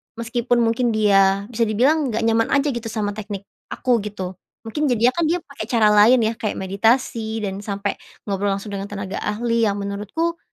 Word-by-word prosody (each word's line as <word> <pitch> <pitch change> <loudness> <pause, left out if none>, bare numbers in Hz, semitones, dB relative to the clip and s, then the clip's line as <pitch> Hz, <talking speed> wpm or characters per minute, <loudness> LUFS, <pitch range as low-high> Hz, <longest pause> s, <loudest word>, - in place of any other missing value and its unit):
meskipun 235 +1 0
mungkin 230 0 +1
dia 195 -2 +4
bisa 230 -1 +1
dibilang 270 +8 +2
nggak 225 -1 -1
nyaman 225 0 +2
aja 280 +1 +2
gitu 235 -2 -5
sama 215 -2 -2
teknik 205 -1 -6 0.2
aku 245 -2 0
gitu 200 -3 -5 0.3
mungkin 290 +7 -2
jadinya 245 -1 +3
kan 335 - +2
dia 345 +3 +1
pakai 280 -7 -7
cara 225 -3 +4
lain 210 +5 +6
ya 220 +1 +1
kayak 215 - -2
meditasi 220 +2 0
dan 195 -1 -3
sampai 200 0 -3 0.2
ngobrol 200 0 -2
langsung 200 +1 -7
dengan 200 0 -4
tenaga 200 -1 -5
ahli 230 +2 0
yang 200 - 0
menurutku, 210 - -3
220 Hz, 180 wpm, -21 LUFS, 205-240 Hz, 0.3 s, lain